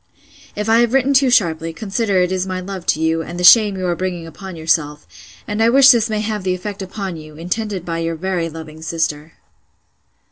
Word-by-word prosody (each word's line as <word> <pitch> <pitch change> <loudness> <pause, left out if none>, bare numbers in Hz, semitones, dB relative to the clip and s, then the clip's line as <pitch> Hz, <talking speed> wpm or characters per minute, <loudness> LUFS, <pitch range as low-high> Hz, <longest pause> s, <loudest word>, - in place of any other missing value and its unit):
'If 210 +1 -3
I 225 +1 +4
have 240 0 +2
written 270 +1 +2
too 270 -1 +4
sharply, 165 -8 +1
consider 205 +1 -1
it 180 0 0
is 185 0 -1
my 185 0 -3
love 185 -1 -7
to 155 - +1
you, 160 0 0
and 175 +2 -7
the - - -3
shame 205 +1 +7
you 185 - -3
are 175 -1 0
bringing 180 -2 -4
upon 190 +3 -10
yourself; 155 -2 -1 0.4
and 210 +2 -2
I 225 - +4
wish 270 +2 +7
this 230 -2 +2
may 215 -1 -1
have 215 -1 -3
the 185 -1 0
effect 200 +2 -7
upon 190 -2 -5
you, 155 -1 -12
intended 185 +2 -4
by 165 -1 -3
your 165 0 -2
very 175 0 -2
loving 160 -1 -10
sister. 160 -1 -3
185 Hz, 215 wpm, -18 LUFS, 165-210 Hz, 0.4 s, shame